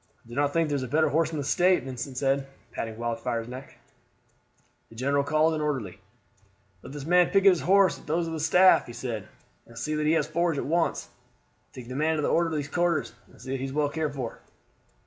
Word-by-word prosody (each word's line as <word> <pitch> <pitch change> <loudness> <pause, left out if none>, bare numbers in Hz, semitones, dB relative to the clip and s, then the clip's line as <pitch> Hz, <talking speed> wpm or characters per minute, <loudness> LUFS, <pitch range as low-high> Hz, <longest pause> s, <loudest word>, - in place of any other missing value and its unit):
"I - - -19
do - - -10
not 145 +2 +1
think 165 +1 +1
there 145 - -1
is 140 - -1
a 130 - -4
better 155 +5 +2
horse 160 +1 +1
in 160 - -4
the 145 - -2
State," 180 +2 +3
Vincent 130 0 -6
said, 135 0 0 0.2
patting 110 -1 -5
Wildfire's 115 0 -3
neck. 130 +2 -10 1.1
The 115 - -15
general 140 +4 +1
called 155 +2 +2
an 155 - -2
orderly. 135 -11 -3 0.8
"Let - - -11
this 145 -1 -7
man 175 +1 +4
picket 195 0 +5
his 180 - 0
horse 195 +1 +3
with - - -18
those 165 +3 0
of 165 - -5
the 160 - -4
staff," 180 +5 +5
he 120 - -9
said, 115 -4 -5 0.4
"and 115 - -15
see 155 +5 -3
that 150 0 0
it 160 - +4
has - - +1
forage 165 0 0
at - - -2
once. 165 +3 0 0.6
Take 125 -2 -10
the 130 - -7
man 155 +3 +1
to 150 - -2
the - - +1
orderly's 160 -4 0
quarters, 175 -1 0
and - - -20
see 130 +2 -8
that 135 - -1
he 135 - -3
is 135 - -6
well 150 0 +1
cared 150 -1 -3
for." 125 -4 -5
145 Hz, 230 wpm, -27 LUFS, 130-165 Hz, 1.1 s, picket